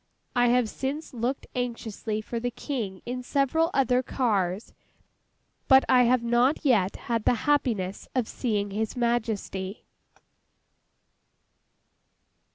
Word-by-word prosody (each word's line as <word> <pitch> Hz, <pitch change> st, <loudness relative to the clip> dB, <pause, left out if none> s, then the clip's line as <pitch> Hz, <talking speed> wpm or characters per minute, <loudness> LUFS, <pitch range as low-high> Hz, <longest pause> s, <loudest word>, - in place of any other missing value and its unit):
I 245 Hz, 0 st, +4 dB
have 245 Hz, -1 st, +3 dB
since 275 Hz, +7 st, -4 dB
looked 245 Hz, +3 st, -2 dB
anxiously 230 Hz, -3 st, -3 dB
for 230 Hz, +2 st, -4 dB
the 245 Hz, +1 st, -1 dB
King 230 Hz, -7 st, -5 dB
in 250 Hz, +1 st, -4 dB
several 285 Hz, +5 st, +1 dB
other 255 Hz, -4 st, +2 dB
cars, 205 Hz, -7 st, -1 dB, 0.9 s
but 265 Hz, -1 st, +7 dB
I 250 Hz, -1 st, +5 dB
have 245 Hz, 0 st, +3 dB
not 240 Hz, +6 st, +2 dB
yet 205 Hz, -8 st, +3 dB
had 230 Hz, -2 st, -1 dB
the -, -, +4 dB
happiness 220 Hz, -10 st, 0 dB
of 250 Hz, -4 st, +1 dB
seeing 205 Hz, -5 st, -2 dB
His 215 Hz, +2 st, -2 dB
Majesty. 220 Hz, -5 st, -2 dB
240 Hz, 115 wpm, -27 LUFS, 215-255 Hz, 0.9 s, but